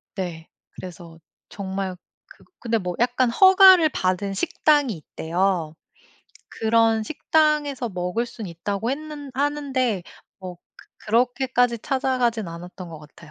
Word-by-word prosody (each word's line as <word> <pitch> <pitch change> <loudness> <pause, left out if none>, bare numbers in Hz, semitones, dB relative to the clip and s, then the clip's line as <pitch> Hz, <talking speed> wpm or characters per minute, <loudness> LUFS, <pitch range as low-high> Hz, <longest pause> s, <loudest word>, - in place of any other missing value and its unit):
네. 170 -4 -5 0.2
그래서 170 -2 -11 0.3
정말 190 -1 -4 0.3
그 - - -19 0.2
근데 230 -1 0
뭐 180 -4 -4
약간 245 +1 +2
허가를 375 +2 +7
받은 190 -4 -1
식당이 290 - +1
있대요. 165 0 -2 0.8
그런 225 0 +2
식당에서 295 -1 0
먹을 180 +4 -2
순 225 -3 -8
있다고 200 +6 -3
했는 295 0 -6
하는데 270 -7 -1 0.4
뭐 185 -2 -8 0.2
그 - - -20 0.2
그렇게까지 245 +1 +1
찾아가진 255 -4 -1
않았던 175 +2 -9
것 160 -2 -9
같아요. 150 +1 -16
225 Hz, 260 characters per minute, -23 LUFS, 185-265 Hz, 0.8 s, 허가를